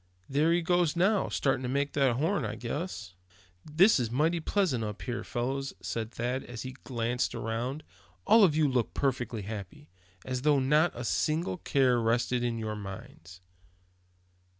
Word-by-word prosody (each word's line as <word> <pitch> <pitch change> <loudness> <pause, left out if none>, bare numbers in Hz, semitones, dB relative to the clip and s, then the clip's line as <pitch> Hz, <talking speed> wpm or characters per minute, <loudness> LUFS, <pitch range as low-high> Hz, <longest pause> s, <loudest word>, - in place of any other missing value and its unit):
There 150 +4 +2
he 170 0 +2
goes 175 -2 +2
now, 195 +4 +2
starting 135 -2 0
to 125 - -3
make 140 +2 -1
the 135 -4 +2
horn, 160 +6 0
I 105 -1 -3
guess." 120 - -5 0.5
"This 170 +5 +4
is 120 -3 -1
mighty 155 +8 +1
pleasant 160 - 0
up 105 -1 -5
here, 120 -1 -3
fellows," 135 +3 -3
said 110 -1 -4
Thad, 125 +3 -2
as 120 -2 -7
he 130 0 -7
glanced 120 0 -1
around; 120 +6 -3 0.4
"all 220 +1 +6
of 165 -6 +4
you 155 -1 +3
look 125 -4 -1
perfectly 125 -5 -1
happy, 100 -4 -8 0.3
as 130 -1 -3
though 145 0 +4
not 150 +5 +3
a 120 - -5
single 155 +9 0
care 130 -7 +2
rested 120 +2 +1
on 120 -1 -1
your 110 -1 -3
minds." 95 -3 -10
130 Hz, 165 wpm, -29 LUFS, 115-155 Hz, 0.5 s, all